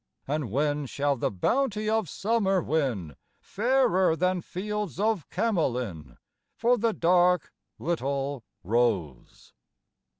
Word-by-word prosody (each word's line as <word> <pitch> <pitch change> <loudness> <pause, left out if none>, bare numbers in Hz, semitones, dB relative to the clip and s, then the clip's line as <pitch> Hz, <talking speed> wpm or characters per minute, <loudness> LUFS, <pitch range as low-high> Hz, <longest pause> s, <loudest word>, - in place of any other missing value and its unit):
And 145 -3 -2
when 145 +4 0
shall 140 +2 0
the 120 - -1
bounty 215 - 0
of 220 -5 +1
summer 200 -1 +1
win 125 - -1 0.2
Fairer 215 -7 +2
than 180 +1 0
fields 205 -1 -4
of 215 -6 0
Camolin 125 - -1 0.4
For 240 +2 +3
the 230 -1 +1
dark 180 -2 +2 0.2
little 140 -5 -2 0.2
Rose? 100 - -1
170 Hz, 105 wpm, -27 LUFS, 135-210 Hz, 0.4 s, For